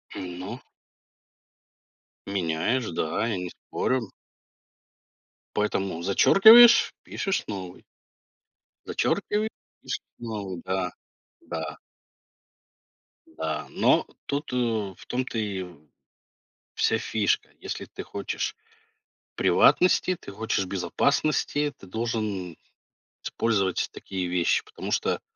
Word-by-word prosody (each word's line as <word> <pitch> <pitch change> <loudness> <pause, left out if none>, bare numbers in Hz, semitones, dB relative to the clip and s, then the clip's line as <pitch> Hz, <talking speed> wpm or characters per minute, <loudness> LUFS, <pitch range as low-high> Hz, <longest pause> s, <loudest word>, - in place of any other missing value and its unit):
Умно. 95 +6 -6 1.7
Меняешь, 100 +6 0
да, 80 +7 -1
я 105 -5 -1
не 90 -1 -4
спорю. 130 +7 -2 1.5
Поэтому 95 -5 -1
зачеркиваешь, 220 - +8
пишешь 195 - -2
новый. 95 -3 -6 1.0
Зачеркивае 215 +1 0 0.3
пишешь - - -4 0.2
новый, 100 -6 -5
да. 95 -1 -1 0.5
Да. - - -5 1.5
Да, 80 -1 -4
но - - +3 0.2
тут, 145 +2 -3
э, - - 0 0.4
в - - -15
том 125 +1 -1
то 120 - -5
и 100 -4 -2
в 90 -4 -12 1.0
вся 110 - +2
фишка. 110 -2 0
Если - - -5
ты - - -8
хочешь 100 - -3 0.8
приватности, 185 0 +4
ты - - -10
хочешь 105 -2 -1
безопасности, 145 +9 0
ты 95 - -14
должен 105 -5 -3 0.7
использовать 100 -5 0
такие 95 -2 -4
вещи. 90 -1 +2
Потому - - -7
что - - +1
100 Hz, 95 wpm, -26 LUFS, 90-125 Hz, 1.7 s, зачеркиваешь